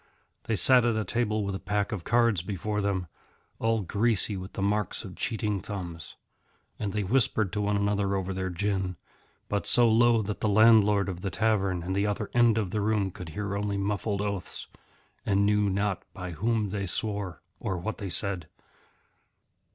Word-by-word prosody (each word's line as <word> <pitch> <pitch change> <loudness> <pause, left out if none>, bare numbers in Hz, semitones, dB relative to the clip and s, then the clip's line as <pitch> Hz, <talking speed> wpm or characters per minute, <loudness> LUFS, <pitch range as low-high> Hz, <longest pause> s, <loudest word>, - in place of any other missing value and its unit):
They 110 - 0
sat 125 +6 +6
at 120 -2 +2
a 110 -1 -1
table 110 0 0
with 100 - -2
a 95 - -4
pack 105 +1 -1
of 100 -6 -4
cards 115 -4 +2
before 105 +3 -3
them, 100 -2 -1 0.5
all 115 -1 +1
greasy 105 +1 +1
with 95 0 -7
the - - -4
marks 105 0 0
of 95 -4 -9
cheating 105 -4 -2
thumbs. 85 -5 -7 0.6
And 105 -2 -2
they 105 +1 -1
whispered 110 -3 +1
to 105 - -1
one 105 0 +1
another 100 -1 0
over 95 0 -2
their 95 0 -2
gin, 95 0 -1 0.5
but 100 -1 -2
so 120 -1 +5
low 115 0 +4
that 105 0 -4
the 110 - 0
landlord 105 -2 +5
of 90 -2 -5
the 95 - -2
tavern 95 -3 0
at 95 +2 -3
the 100 +2 +1
other 105 0 -3
end 120 -2 +4
of 100 -5 -1
the 105 - -1
room 105 -2 +1
could 90 -1 -9
hear 100 +4 -4
only 100 0 -1
muffled 100 0 -1
oaths, 100 -3 -4 0.6
and 100 0 +2
knew 105 0 +2
not 100 0 -1
by 90 -1 -6
Whom 110 +4 0
they 100 0 -3
swore 100 -1 -1 0.2
or 95 - -2
what 110 +6 -4
they 100 -3 -4
said. 95 -3 0
100 Hz, 185 wpm, -28 LUFS, 95-110 Hz, 0.6 s, sat